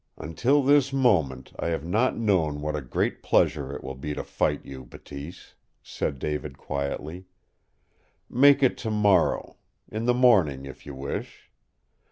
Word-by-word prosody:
"Until 120 - +1
this 140 0 +4
moment 80 - +1
I - - -2
have 80 -2 -2
not 110 +9 +1
known 90 -10 +1
what 75 +1 -3
a 75 - -3
great 65 - -2
pleasure 75 -4 +1
it - - -8
will 65 - -5
be 75 +3 -5
to - - -4
fight - - -1
you, 65 -1 -9
Bateese," 70 +6 -11 0.3
said 70 - -3
David 75 -1 -4
quietly. 75 +6 -4 1.0
"Make 140 +2 +5
it 130 - +2
tomorrow 105 -5 +1 0.3
in 110 +2 -4
the 125 0 +3
morning, 95 - +3
if 70 +1 -11
you 70 - -7
wish. 70 +1 -6
80 Hz, 150 wpm, -26 LUFS, 70-115 Hz, 1.0 s, Make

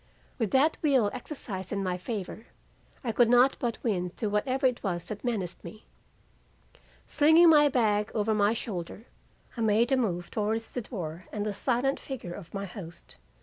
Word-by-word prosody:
With 225 -4 0
that 280 +7 +3
will 260 -9 +3
exercised 205 - -6
in 200 -1 -1
my 180 -1 -1
favor, 205 +2 -6 0.6
I 240 - -1
could 235 +1 +3
not 245 +2 +5
but 235 -2 -2
win 180 -6 0
through 205 +4 -4
whatever 255 +6 0
it 250 -2 +2
was 175 -4 -3
that 210 -1 -6
menaced 210 -8 -3
me. 215 - -11 1.2
Slinging 320 +3 +6
my 295 -2 +6
bag 215 -5 +1
over 215 0 +1
my 210 0 +3
shoulder, 210 -2 -5 0.5
I 235 - -4
made 225 +3 +3
a 265 - +4
move 175 -8 -2
towards 220 +1 -1
the 250 - -3
door 175 -6 -6
and 210 -1 -3
the 210 - -2
silent 250 +6 0
figure 235 -10 -7
of 175 -4 -10
my 200 0 -4
host. 175 - -10
215 Hz, 175 wpm, -28 LUFS, 195-250 Hz, 1.2 s, Slinging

